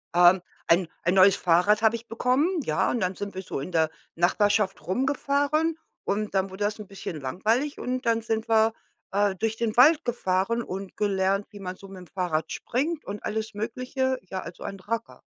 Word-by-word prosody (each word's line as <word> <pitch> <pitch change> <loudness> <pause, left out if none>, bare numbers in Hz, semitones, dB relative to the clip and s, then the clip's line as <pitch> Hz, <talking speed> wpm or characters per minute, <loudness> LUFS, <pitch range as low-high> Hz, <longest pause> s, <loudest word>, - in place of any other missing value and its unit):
Ähm, 175 +1 +6 0.3
ein 170 +1 +4 0.2
ein 175 - +2
neues 190 0 +7
Fahrrad 200 +4 +3
habe 220 +1 +5
ich 230 0 -8
bekommen, 250 +6 +2 0.2
ja, - - +1
und 240 - 0
dann 185 -1 0
sind 200 -1 -6
wir 190 - -3
so 140 - -4
in 160 +7 -6
der 160 -2 +2 0.3
Nachbarschaft 195 +1 +2
rumgefahren 285 - +1 0.3
und 210 +1 -2
dann 195 0 +1
wurde 190 +2 -5
das 215 +1 -2
'n 210 - -8
bisschen 190 -5 -6
langweilig 225 - 0
und 255 0 -3
dann 230 0 +3
sind 220 0 -2
wir, 220 0 +4 0.4
äh, 200 0 +2
durch 220 +3 -1
den 225 -2 -1
Wald 305 +6 +7
gefahren 230 0 0
und 195 -1 -7
gelernt, 195 -1 +1
wie 205 - -11
man 185 -1 -5
so 195 - -14
mit'm 185 -2 -11
Fahrrad 160 -4 -1
springt 300 +6 -2
und 205 +1 -6
alles 220 +1 -3
Mögliche, 255 +5 -2
ja, 185 0 -5
also, 170 - -9
ein 195 -1 -6
Racker. 230 +4 -4
205 Hz, 190 wpm, -26 LUFS, 185-235 Hz, 0.4 s, neues